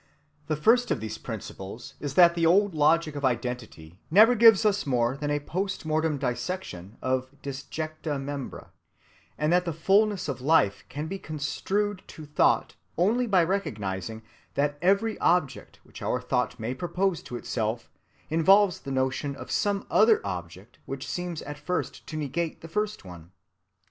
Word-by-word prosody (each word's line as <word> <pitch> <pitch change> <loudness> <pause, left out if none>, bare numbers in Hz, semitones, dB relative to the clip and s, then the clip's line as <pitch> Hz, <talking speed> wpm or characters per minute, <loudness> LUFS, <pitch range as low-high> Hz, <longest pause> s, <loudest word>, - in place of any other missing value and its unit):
The 155 - 0
first 230 - +3
of - - 0
these 110 0 -6
principles 110 0 -8
is 140 -2 -5
that 175 -1 +7
the 170 -1 -2
old 190 +4 +4
logic 155 0 +2
of 145 - -5
identity 120 -10 -3
never 215 +8 +7
gives 225 -2 +6
us 205 -5 +1
more 120 -1 +1
than 145 +1 -3
a 145 0 +1
post‐mortem 160 -2 -1
dissection 125 - -4
of 130 0 0
disjecta 155 +2 -4
membra, 140 -1 -6 0.7
and 150 +3 +1
that 180 0 +4
the 170 - -2
fullness 195 +4 +2
of 135 -3 -4
life 135 -8 +3
can 150 +3 -4
be 195 +4 -5
construed 185 +7 -2
to 155 - -10
thought 150 - +2 0.2
only 225 +8 +2
by 190 -5 +4
recognizing 110 - -3 0.3
that 145 +1 0
every 200 +5 +2
object 170 -6 0
which - - -13
our 125 - 0
thought 125 -1 -1
may 115 +3 -2
propose 175 +5 -1
to 125 - -8
itself 115 -1 -3 0.4
involves 185 +4 +4
the 140 - -8
notion 130 +2 -1
of - - -9
some 200 -1 0
other 220 0 +5
object 90 +1 -7
which 135 0 -5
seems 175 -2 -4
at 145 0 -7
first 180 +4 -3
to 155 - -5
negate 155 +3 -3
the 165 - -9
first 210 - -3
one. 85 -2 -11
150 Hz, 160 wpm, -27 LUFS, 125-185 Hz, 0.7 s, that